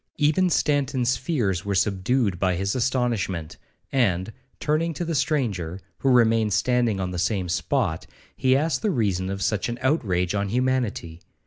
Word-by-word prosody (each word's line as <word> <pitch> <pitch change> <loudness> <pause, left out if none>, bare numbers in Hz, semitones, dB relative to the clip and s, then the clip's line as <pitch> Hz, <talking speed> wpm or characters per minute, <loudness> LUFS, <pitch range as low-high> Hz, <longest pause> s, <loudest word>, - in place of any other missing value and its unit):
Even 155 +5 +3
Stanton's 135 -5 +1
fears 115 - -1
were 100 -1 -2
subdued 100 +1 +1
by 95 -1 +1
his 95 +3 -1
astonishment, 115 -10 -1 0.3
and, 105 -5 +1 0.3
turning 155 +2 0
to 175 - -3
the 165 - -2
stranger, 105 - -1 0.2
who 135 - +1
remained 115 -4 +4
standing 120 0 +1
on 90 -1 -2
the 90 - -4
same 90 +1 0
spot, 80 -1 -1 0.3
he 130 0 +3
asked 150 -2 0
the 215 - +1
reason 100 - 0
of 95 0 -3
such 105 +1 0
an 120 - -3
outrage 95 - +1
on 100 -1 -1
humanity. 120 -9 -1
115 Hz, 155 wpm, -24 LUFS, 95-130 Hz, 0.3 s, remained